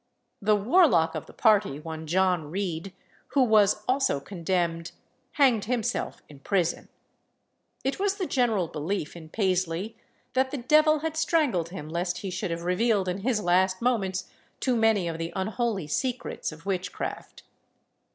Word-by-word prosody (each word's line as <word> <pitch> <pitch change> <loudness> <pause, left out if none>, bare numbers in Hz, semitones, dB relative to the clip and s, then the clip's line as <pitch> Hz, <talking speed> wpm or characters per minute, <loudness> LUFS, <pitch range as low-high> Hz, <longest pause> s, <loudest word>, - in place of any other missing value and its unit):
The 210 +1 +4
warlock 205 - +4
of 155 - -5
the - - -12
party, 205 - +3
one 160 0 -7
John 180 -2 +1
Reed, 185 0 -3 0.4
who 275 - +6
was 210 -3 +4
also 260 - +2
condemned, 170 0 -2 0.4
hanged 255 -8 +3
himself 240 0 -2
in 145 -2 -14
prison. 175 +1 -1 0.9
It 270 +4 -1
was 400 0 +1
the 385 - -2
general 230 - +1
belief 155 +2 -3
in 160 -2 -10
Paisley 185 +1 -1 0.4
that 260 0 +2
the 285 - -4
devil 305 +4 +4
had 320 0 -3
strangled 300 - +1
him 155 -5 -7
lest 175 +2 -2
he 195 - -4
should 185 +1 -3
have 170 0 -4
revealed 195 +2 +1
in 180 +2 -2
his 230 +1 0
last 185 +1 +2
moments 195 -7 0 0.3
too 255 -2 +1
many 225 -5 +3
of 165 -1 -4
the 165 +1 -3
unholy 205 -1 -1
secrets 250 - -2
of 160 +2 -13
witchcraft. 190 -2 -4
195 Hz, 150 wpm, -27 LUFS, 170-240 Hz, 0.9 s, who